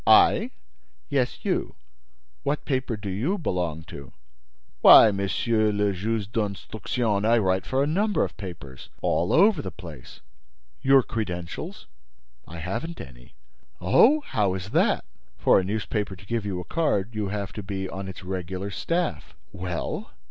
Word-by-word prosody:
"I?" - - +6 0.6
"Yes, 130 -3 -1
you: - - -1 0.7
what 150 +1 -2
paper 130 -4 -1
do 100 0 -7
you 120 - -1
belong 90 - -2
to?" 70 -3 -11 0.7
"Why, 110 - +9
Monsieur 105 +2 +1
le 105 -1 +1
Juge 105 +2 -2
d'Instruction, 105 0 -1
I 115 +2 +4
write 95 -3 +1
for 135 +1 +1
a - - +2
number 200 +8 +1
of - - -4
papers—all 85 -2 -4
over 195 -2 +5
the - - -5
place—" 85 -9 -11 0.6
"Your 135 -1 +5
credentials?" 105 - -5 0.6
"I 85 - -9
haven't 110 - -4
any." 60 -2 -12 0.4
"Oh! 230 - +5
How 100 - 0
is 95 +2 -6
that?" - - +2 0.3
"For - - +5
a - - -1
newspaper 105 0 -2
to 95 - -15
give 115 -1 -2
you 95 -3 -2
a - - -5
card, 115 - 0
you 105 -2 -2
have 100 0 -4
to 105 - -5
be 95 -1 -4
on 95 +1 -6
its 95 -1 -8
regular 95 +1 -4
staff." 170 - -2 0.2
"Well?" 90 -1 -4
100 Hz, 150 wpm, -25 LUFS, 95-120 Hz, 0.7 s, Why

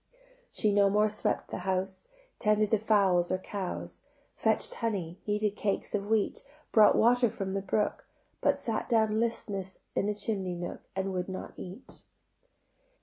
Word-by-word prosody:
She 210 -1 +1
no 200 -1 +5
more 210 +2 +3
swept 210 - -1
the - - -3
house, 190 - -2 0.3
Tended 210 0 +2
the 220 - +4
fowls 195 -5 +3
or 185 - +2
cows, 185 0 -5 0.3
Fetch'd - - +1
honey, 190 -7 -3
kneaded 210 0 +1
cakes 200 -2 -2
of 200 -1 -1
wheat, 220 -1 +1 0.3
Brought 215 -2 +7
water 245 +1 +4
from 195 -2 -4
the 195 - -1
brook: 205 +2 -1 0.3
But - - +2
sat 225 -3 -2
down 220 -2 +3
listless 200 -5 -2 0.2
in 200 - 0
the 210 - 0
chimney 200 -3 -2
nook 175 0 -5
And 190 0 -1
would 180 0 -2
not 185 - -6
eat. 185 +8 -10
205 Hz, 155 wpm, -30 LUFS, 190-215 Hz, 0.3 s, Brought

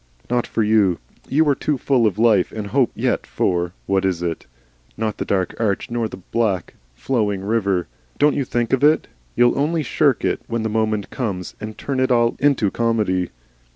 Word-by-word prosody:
"Not 120 -1 +1
for 110 - 0
you. 105 -5 +3 0.3
You 155 +3 +3
are 145 - +5
too 145 +1 -1
full 125 -3 +2
of 105 - -2
life 110 -4 +3
and 110 -2 -5
hope 130 +4 +2
yet - - -1
for, 90 -1 0
what 95 -1 +1
is 90 -3 0
it? 85 -2 -3 0.5
not 110 -1 -2
the - - -2
dark 95 -3 0
arch 110 0 -1
nor 120 -1 0
the 105 - -9
black 95 -1 -1 0.2
flowing 105 - -1
river. 100 -4 0 0.3
Don't 145 +1 +4
you 140 - 0
think 120 -1 -1
of 135 +1 +2
it. 155 +2 +4 0.3
You'll 120 +2 +3
only 155 +2 +1
shirk - - +1
it - - 0
when 115 -1 -2
the 110 - -1
moment 110 -2 -1
comes, 100 -9 -3
and 110 0 -6
turn 135 -2 -3
it 130 0 +2
all 120 -1 +3
into 130 -8 +2
comedy." 105 -6 0
110 Hz, 190 wpm, -21 LUFS, 100-125 Hz, 0.5 s, are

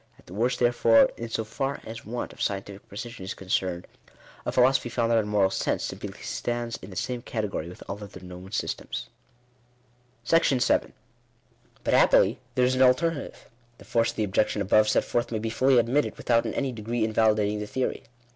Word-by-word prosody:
At - - -22
the 90 - -12
worst 120 +5 +1
therefore, 120 -2 +5
in 115 0 -6
so 110 - -1
far 135 +5 -3
as 115 +1 -8
want 120 +2 -4
of - - -12
scientific 100 0 -3
precision 120 -1 -7
is 95 - -5
concerned, 90 -2 -2 0.6
a - - +1
philosophy 130 0 +3
founded 115 -1 +2
on 105 - -1
Moral 100 -2 +2
Sense, - - -1
simply - - -5
stands 120 -1 -3
in - - -10
the 95 - -10
same 125 +3 -3
category 105 -8 -3
with 90 - -11
all 100 +1 -6
other 100 -2 -10
known 90 +1 -10
systems. - - -4 1.2
§7. 135 -5 +2 0.9
But - - 0
happily - - +5 0.2
there 125 - +4
is 130 - +2
an 130 - +1
alternative. 140 +4 +2 0.3
The - - -15
force 115 -1 +2
of - - -6
the 110 - 0
objec 105 +1 +1
tion 105 - -1
above 105 +2 +4
set - - +3
forth 120 0 -1
may 110 - -1
be 110 +1 -3
fully 130 +2 +3
admitted, 120 +5 +1
without 115 -1 +2
in - - -4
any 135 -2 -1
de 115 -3 -8
gree 115 +1 -1
invalidating 110 -1 +2
the 105 - -4
theory. 130 +5 -2
115 Hz, 195 wpm, -26 LUFS, 105-125 Hz, 1.2 s, therefore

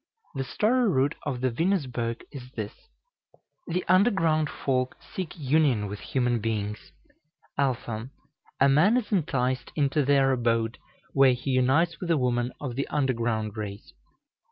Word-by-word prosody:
The 135 - -2
story 230 - +2
root 140 -2 +2
of 130 -4 -2
the 130 -1 +1
Venusberg 125 -7 -1
is 125 -3 -9
this: 105 -2 -4 0.9
The 175 +2 -2
underground 170 -6 +3
folk 130 -2 -1
seek 185 -2 -7
union 140 -6 +2
with 100 0 -6
human 125 -4 0
beings. 105 -1 -3 0.7
α. 120 -3 -1 0.5
A 140 - +6
man 165 - +5
is 240 -3 -3
enticed 130 - 0
into 145 0 +2
their 135 -1 +4
abode, 115 -2 0 0.3
where 135 -2 +6
he 125 +2 -3
unites 135 +7 +2
with 180 - -5
a 165 - +4
woman 125 -1 0
of 130 -5 -5
the 140 - -2
underground 115 -6 -1
race. 105 -2 -7
130 Hz, 140 wpm, -27 LUFS, 120-155 Hz, 0.9 s, A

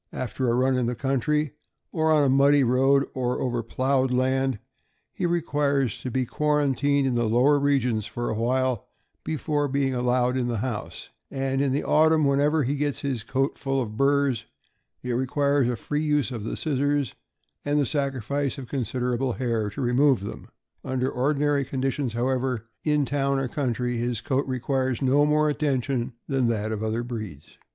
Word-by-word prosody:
After 130 0 -2
a 115 - +2
run 130 +1 +2
in 125 -2 0
the 120 - -1
country, 135 +3 0 0.4
on 155 -2 +3
a - - +3
muddy 140 +1 +5
road, 135 +3 +3
or 125 -1 -1
over 120 -2 -1
plowed 130 +3 0
land, 130 0 +1 0.6
he 180 - -1
requires 145 -8 0
to 130 - -4
be 130 +1 0
quar 150 +4 +1
antined 140 0 +1
in 130 - +1
the 120 -2 +1
lower 135 +6 +4
regions 125 -6 +1
for 120 0 -4
awhile 125 +1 0 0.4
before 150 -2 -1
being 135 -1 0
allowed 125 0 +1
in 125 -2 0
the 120 -2 -1
house; 110 -1 -5 0.2
and 135 0 -1
in 140 -1 +1
the 140 - 0
autumn, 155 0 +4
whenever 145 +2 +2
he 140 +3 -1
gets 145 -1 -1
his 135 -5 -2
coat 135 +5 -1
full 135 0 -1
of 110 -4 -4
burs, 140 -3 +2 0.6
it 125 - -3
requires 140 +1 +1
a 125 - 0
free 150 +5 -3
use 150 -3 +1
of 115 -4 -5
the 110 - -4
scissors 145 -3 0 0.5
and 145 +1 +1
the 145 - +2
sacrifice 140 0 -2
of 130 -3 -7
considerable 125 0 -1
hair 115 -4 -1
to 110 - -6
remove 130 0 +3
them. 100 - -7 0.4
Under 130 0 -1
ordi 140 +4 0
nary 145 -1 +2
conditions, 135 -1 -2
however, 125 -1 -1 0.2
in 150 -2 +2
town 140 0 0
or 135 -1 -1
countryr 125 -2 -2
his 120 -1 -1
coat 135 +2 -1
requires 130 -1 -1
no 140 +3 +4
more 150 0 +3
attention 135 -4 -1
than 135 -3 +1
that 110 -1 -1
of 110 -1 -3
other 110 +2 -1
breeds. 110 - -8
130 Hz, 175 wpm, -25 LUFS, 125-140 Hz, 0.6 s, muddy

